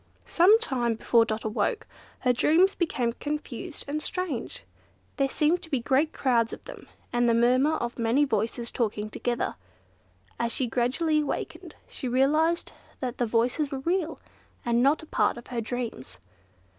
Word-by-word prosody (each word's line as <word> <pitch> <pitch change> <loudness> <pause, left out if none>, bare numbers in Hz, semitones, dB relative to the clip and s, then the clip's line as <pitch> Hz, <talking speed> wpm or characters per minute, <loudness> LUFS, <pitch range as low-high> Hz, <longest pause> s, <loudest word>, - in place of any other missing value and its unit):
Some 375 +6 +6
time 245 - 0
before 230 +1 +3
Dot 220 -1 -3
woke, 425 - -1 0.4
her 250 -1 +3
dreams 340 +10 +4
became 255 -9 -1
confused 300 +3 -5
and 300 +2 -2
strange. 310 -9 -4 0.5
There 275 -1 +2
seemed 310 +6 +2
to 325 - -8
be 270 - +1
great 270 +6 +2
crowds 235 -3 +1
of - - -9
them, - - -10 0.3
and 240 0 +3
the 230 - +4
murmur 255 +6 +3
of 240 -2 -4
many 235 +6 +3
voices 230 0 -1
talking 215 -2 -2
together. 240 +1 -2 0.8
As 235 0 0
she 260 - 0
gradually 260 +7 +1
awakened, 300 - -4
she 260 - -5
realised 305 +7 +2 0.3
that 250 -3 -4
the 240 - +1
voices 245 +6 +1
were 270 -1 -4
real, 335 +1 -1 0.5
and 235 0 +2
not 285 +5 +3
a - - -9
part 310 - +1
of 240 - -10
her 235 - -1
dreams. 225 - -5
255 Hz, 160 wpm, -27 LUFS, 235-305 Hz, 0.8 s, Some